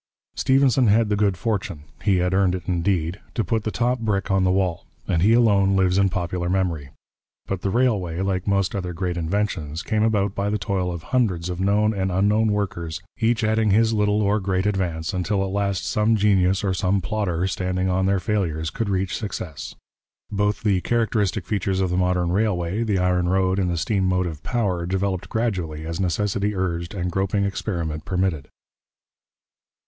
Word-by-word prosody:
Stephenson 130 Hz, -2 st, +3 dB
had 110 Hz, +1 st, +3 dB
the 105 Hz, -, +2 dB
good 100 Hz, -3 st, +1 dB
fortune, 95 Hz, -7 st, -3 dB, 0.2 s
he 100 Hz, -2 st, +2 dB
had 90 Hz, +1 st, 0 dB
earned 95 Hz, -1 st, +3 dB
it 90 Hz, -, -5 dB
indeed, 90 Hz, 0 st, 0 dB, 0.2 s
to 115 Hz, -, +1 dB
put 110 Hz, -1 st, -1 dB
the 110 Hz, -, -1 dB
top 120 Hz, +3 st, 0 dB
brick 100 Hz, -4 st, -1 dB
on 95 Hz, -1 st, +3 dB
the 90 Hz, -, +3 dB
wall, 95 Hz, -3 st, -1 dB, 0.2 s
and 80 Hz, -, +1 dB
he 105 Hz, +5 st, +5 dB
alone 100 Hz, -5 st, +4 dB
lives 95 Hz, 0 st, +3 dB
in 100 Hz, -1 st, +3 dB
popular 90 Hz, -1 st, -2 dB
memory. 90 Hz, -7 st, -1 dB, 0.6 s
But 95 Hz, -2 st, -3 dB
the 100 Hz, -, -1 dB
railway, 100 Hz, -8 st, +1 dB
like 95 Hz, -1 st, -1 dB
most 100 Hz, -2 st, +1 dB
other 90 Hz, -3 st, -3 dB
great 90 Hz, 0 st, -2 dB
inventions, 85 Hz, -3 st, -2 dB
came 110 Hz, -1 st, 0 dB
about 105 Hz, -3 st, +1 dB
by 100 Hz, 0 st, -1 dB
the 105 Hz, -, 0 dB
toil 95 Hz, -4 st, -1 dB
of 85 Hz, -2 st, -6 dB
hundreds 90 Hz, -9 st, 0 dB
of 90 Hz, -, -5 dB
known 105 Hz, +3 st, +2 dB
and 95 Hz, -2 st, -1 dB
unknown 105 Hz, +4 st, +2 dB
workers, 85 Hz, -5 st, -2 dB, 0.2 s
each 115 Hz, 0 st, +1 dB
adding 110 Hz, 0 st, +2 dB
his 110 Hz, +3 st, +3 dB
little 105 Hz, 0 st, +2 dB
or 105 Hz, +2 st, +2 dB
great 95 Hz, -1 st, -1 dB
advance, 90 Hz, -4 st, -1 dB
until 95 Hz, +2 st, 0 dB
at 95 Hz, -, -3 dB
last 100 Hz, -1 st, -1 dB
some 110 Hz, +1 st, +2 dB
genius 95 Hz, -2 st, +2 dB
or 95 Hz, -2 st, +1 dB
some 95 Hz, +2 st, +1 dB
plodder, 95 Hz, -4 st, -1 dB
standing 90 Hz, 0 st, -1 dB
on 95 Hz, +1 st, +1 dB
their 100 Hz, 0 st, +2 dB
failures, 85 Hz, -7 st, -1 dB
could 115 Hz, -4 st, -3 dB
reach 95 Hz, -1 st, -1 dB
success. 80 Hz, -, -6 dB, 0.6 s
Both 105 Hz, +1 st, 0 dB
the 100 Hz, -4 st, +2 dB
characteristic 110 Hz, -5 st, 0 dB
features 95 Hz, -1 st, -1 dB
of 95 Hz, -2 st, 0 dB
the -, -, 0 dB
modern 90 Hz, -1 st, +1 dB
railway, 95 Hz, -1 st, 0 dB
the 105 Hz, -4 st, 0 dB
iron 90 Hz, -1 st, +1 dB
road 95 Hz, 0 st, +2 dB
and 90 Hz, -2 st, +1 dB
the 85 Hz, -, -1 dB
steam 95 Hz, +2 st, 0 dB
motive 90 Hz, -4 st, -1 dB
power, 95 Hz, -8 st, -1 dB
developed 95 Hz, 0 st, -2 dB
gradually 90 Hz, -10 st, -2 dB
as 85 Hz, +2 st, -4 dB
necessity 100 Hz, +3 st, 0 dB
urged 85 Hz, 0 st, -2 dB
and 90 Hz, -1 st, -2 dB
groping 95 Hz, +2 st, 0 dB
experiment 85 Hz, -6 st, -3 dB
permitted. 90 Hz, -6 st, -1 dB
95 Hz, 185 wpm, -23 LUFS, 90-105 Hz, 0.6 s, he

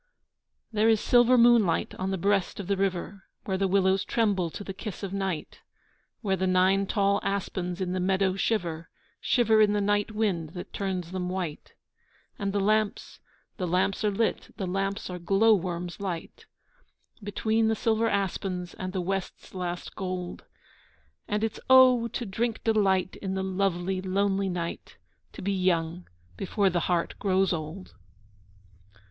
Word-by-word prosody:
There 220 Hz, 0 st, +3 dB
is 220 Hz, -1 st, +4 dB
silver 245 Hz, +2 st, +5 dB
moonlight 235 Hz, -8 st, +4 dB
on 185 Hz, +1 st, -1 dB
the 190 Hz, -, -1 dB
breast 200 Hz, +1 st, 0 dB
of 200 Hz, -, -4 dB
the 200 Hz, +2 st, 0 dB
river 195 Hz, 0 st, -2 dB, 0.2 s
Where 190 Hz, -, -1 dB
the 195 Hz, -, +2 dB
willows 190 Hz, 0 st, +2 dB
tremble 200 Hz, -7 st, +1 dB
to 205 Hz, -, -7 dB
the 195 Hz, -, -6 dB
kiss 200 Hz, +1 st, -7 dB
of 195 Hz, -1 st, -4 dB
night, 190 Hz, -5 st, -3 dB, 0.6 s
Where 195 Hz, -3 st, +1 dB
the 190 Hz, 0 st, -1 dB
nine 190 Hz, +2 st, +3 dB
tall 200 Hz, -1 st, +2 dB
aspens 185 Hz, -2 st, -3 dB
in 180 Hz, -1 st, -1 dB
the 185 Hz, -, -1 dB
meadow 190 Hz, +1 st, +1 dB
shiver, 170 Hz, -6 st, -1 dB, 0.3 s
Shiver 225 Hz, -3 st, +3 dB
in 210 Hz, -1 st, +4 dB
the 210 Hz, -, +1 dB
night 205 Hz, +1 st, +1 dB
wind 195 Hz, -8 st, -1 dB
that 180 Hz, -, -8 dB
turns 185 Hz, -3 st, -3 dB
them 180 Hz, -1 st, -3 dB
white. 180 Hz, -5 st, -5 dB, 0.6 s
And 200 Hz, -1 st, -1 dB
the 200 Hz, -, 0 dB
lamps, 215 Hz, +1 st, 0 dB, 0.4 s
the 185 Hz, -4 st, -2 dB
lamps 185 Hz, +4 st, +1 dB
are 210 Hz, -, +3 dB
lit, 220 Hz, +3 st, -1 dB
the 195 Hz, -, -2 dB
lamps 195 Hz, +3 st, -2 dB
are 180 Hz, -, -5 dB
glow 195 Hz, +6 st, +4 dB
worms 175 Hz, -2 st, -2 dB
light, 180 Hz, -5 st, -6 dB, 0.7 s
Between 220 Hz, +2 st, 0 dB
the 220 Hz, -, +2 dB
silver 225 Hz, +1 st, +1 dB
aspens 185 Hz, -2 st, -2 dB
and 185 Hz, 0 st, -6 dB
the 185 Hz, -, -1 dB
west's 195 Hz, +1 st, -4 dB
last 180 Hz, -1 st, -5 dB
gold. 185 Hz, -2 st, -5 dB, 0.8 s
And 210 Hz, +1 st, -1 dB
it's 225 Hz, -, -2 dB
oh! 255 Hz, -2 st, +7 dB
to 235 Hz, +1 st, -4 dB
drink 225 Hz, +3 st, -2 dB
delight 195 Hz, -5 st, +2 dB
in 190 Hz, -1 st, -4 dB
the 190 Hz, -, -1 dB
lovely 190 Hz, -1 st, -1 dB
lonely 195 Hz, +1 st, 0 dB
night, 170 Hz, -2 st, -5 dB, 0.4 s
To -, -, -9 dB
be 200 Hz, +1 st, 0 dB
young 175 Hz, -2 st, 0 dB, 0.3 s
before 195 Hz, 0 st, +1 dB
the 175 Hz, -, +1 dB
heart 175 Hz, -2 st, +1 dB
grows 190 Hz, -1 st, +2 dB
old! 165 Hz, +4 st, -6 dB
195 Hz, 160 wpm, -27 LUFS, 185-205 Hz, 0.8 s, oh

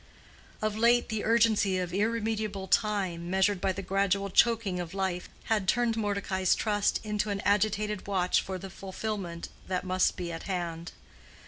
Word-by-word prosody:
Of 215 Hz, -1 st, 0 dB
late 235 Hz, +2 st, +3 dB
the 220 Hz, -2 st, -2 dB
urgency 220 Hz, -4 st, +3 dB
of 180 Hz, -1 st, -3 dB
irremediable 215 Hz, -1 st, -1 dB
time, 185 Hz, -5 st, 0 dB
measured 190 Hz, +1 st, +2 dB
by 195 Hz, -, +2 dB
the 195 Hz, +1 st, -5 dB
gradual 195 Hz, 0 st, 0 dB
choking 220 Hz, -4 st, +3 dB
of 175 Hz, +1 st, -5 dB
life, 190 Hz, -2 st, -2 dB
had 210 Hz, -4 st, 0 dB
turned 240 Hz, 0 st, +2 dB
Mordecai's 200 Hz, -3 st, 0 dB
trust 205 Hz, -2 st, +1 dB
into 210 Hz, 0 st, -1 dB
an 200 Hz, -1 st, -1 dB
agitated 210 Hz, 0 st, +1 dB
watch 185 Hz, -3 st, +2 dB
for 190 Hz, -1 st, -5 dB
the 190 Hz, +1 st, -8 dB
fulfillment 190 Hz, -3 st, -5 dB, 0.2 s
that 185 Hz, -1 st, -1 dB
must 185 Hz, 0 st, +1 dB
be 175 Hz, -2 st, -4 dB
at 165 Hz, -, -5 dB
hand. 170 Hz, -2 st, -3 dB
195 Hz, 155 wpm, -29 LUFS, 185-215 Hz, 0.2 s, late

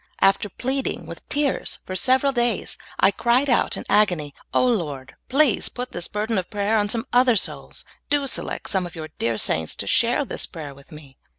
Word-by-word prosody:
After 195 Hz, +1 st, +3 dB
pleading 265 Hz, +7 st, -2 dB
with -, -, -10 dB
tears 290 Hz, -2 st, -1 dB
for 185 Hz, -, -5 dB
several 265 Hz, +5 st, +3 dB
days, 240 Hz, -4 st, +1 dB, 0.2 s
I 195 Hz, -, +5 dB
cried 240 Hz, +6 st, +2 dB
out 240 Hz, -, +2 dB
in -, -, -4 dB
an -, -, -12 dB
agony, 180 Hz, -9 st, +2 dB, 0.2 s
"O -, -, +3 dB
lyord,* 150 Hz, -, -1 dB, 0.2 s
please 275 Hz, -4 st, +3 dB
put 250 Hz, 0 st, -6 dB
this 175 Hz, -, -5 dB
burden 215 Hz, 0 st, -1 dB
of 180 Hz, -, -6 dB
prayer 205 Hz, +1 st, 0 dB
on 205 Hz, -1 st, +2 dB
some 230 Hz, +2 st, -1 dB
other 245 Hz, -1 st, +5 dB
souls; 200 Hz, -, -4 dB, 0.2 s
do 290 Hz, -1 st, +2 dB
select 265 Hz, -, -2 dB
some 190 Hz, -3 st, 0 dB
of 175 Hz, -, -13 dB
your 155 Hz, -1 st, -6 dB
dear 115 Hz, -1 st, 0 dB
saints 80 Hz, -6 st, 0 dB
to -, -, -3 dB
share -, -, +2 dB
this -, -, -4 dB
pra3^er 150 Hz, -3 st, -8 dB
with 140 Hz, +4 st, -18 dB
me." 145 Hz, -4 st, -13 dB
210 Hz, 200 wpm, -23 LUFS, 165-250 Hz, 0.2 s, I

